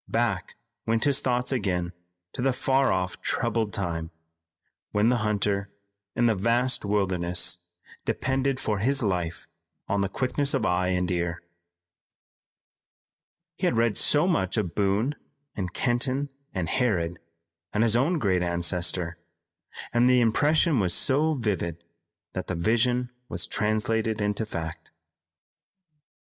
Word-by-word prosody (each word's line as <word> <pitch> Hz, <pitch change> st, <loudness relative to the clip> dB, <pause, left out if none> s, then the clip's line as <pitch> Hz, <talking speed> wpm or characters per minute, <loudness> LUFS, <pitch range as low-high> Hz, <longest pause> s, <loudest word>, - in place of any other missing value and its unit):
Back -, -, -1 dB, 0.3 s
went 115 Hz, 0 st, +2 dB
his 140 Hz, -2 st, +4 dB
thoughts 125 Hz, 0 st, 0 dB
again 90 Hz, -8 st, -1 dB, 0.4 s
to -, -, -4 dB
the 135 Hz, 0 st, +2 dB
far 135 Hz, +1 st, +2 dB
off 90 Hz, 0 st, -2 dB
troubled 110 Hz, -3 st, 0 dB
time, 85 Hz, -4 st, -3 dB, 0.8 s
when 105 Hz, +2 st, +2 dB
the 125 Hz, -, +3 dB
hunter 100 Hz, -2 st, 0 dB, 0.5 s
in 120 Hz, -, +2 dB
the 115 Hz, -, +4 dB
vast 120 Hz, +6 st, +1 dB
wilderness 90 Hz, -4 st, +1 dB, 0.4 s
depended 135 Hz, 0 st, 0 dB
for 105 Hz, -6 st, -1 dB
his 135 Hz, +5 st, +1 dB
life 90 Hz, -5 st, -2 dB, 0.4 s
on 100 Hz, 0 st, 0 dB
the 100 Hz, -, 0 dB
quickness 135 Hz, +5 st, +1 dB
of -, -, 0 dB
eye 90 Hz, +1 st, +1 dB
and 90 Hz, 0 st, 0 dB
ear. 85 Hz, -1 st, -2 dB, 2.1 s
He -, -, +1 dB
had -, -, +1 dB
read 115 Hz, -2 st, +2 dB
so 150 Hz, +4 st, +4 dB
much 95 Hz, -, 0 dB
of 90 Hz, -6 st, -1 dB
Boone 105 Hz, +8 st, +1 dB, 0.4 s
and 90 Hz, -3 st, -3 dB
Kenton 130 Hz, +5 st, 0 dB, 0.2 s
and 90 Hz, -4 st, -2 dB
Harrod, 85 Hz, -6 st, 0 dB, 0.5 s
and 105 Hz, -, +2 dB
his 115 Hz, -1 st, +2 dB
own 145 Hz, +9 st, +2 dB
great 95 Hz, -, +1 dB
ancestor, 85 Hz, 0 st, 0 dB, 0.7 s
and 120 Hz, +1 st, +4 dB
the 125 Hz, 0 st, +5 dB
impression 145 Hz, +5 st, +3 dB
was 90 Hz, -4 st, +2 dB
so 150 Hz, +4 st, +2 dB
vivid, 90 Hz, -, -2 dB, 0.5 s
that -, -, -4 dB
the -, -, -2 dB
vision 120 Hz, +7 st, +1 dB, 0.2 s
was -, -, -2 dB
translated 110 Hz, +1 st, 0 dB
into 105 Hz, +1 st, -1 dB
fact. 80 Hz, -5 st, -6 dB
105 Hz, 130 wpm, -26 LUFS, 90-125 Hz, 2.1 s, the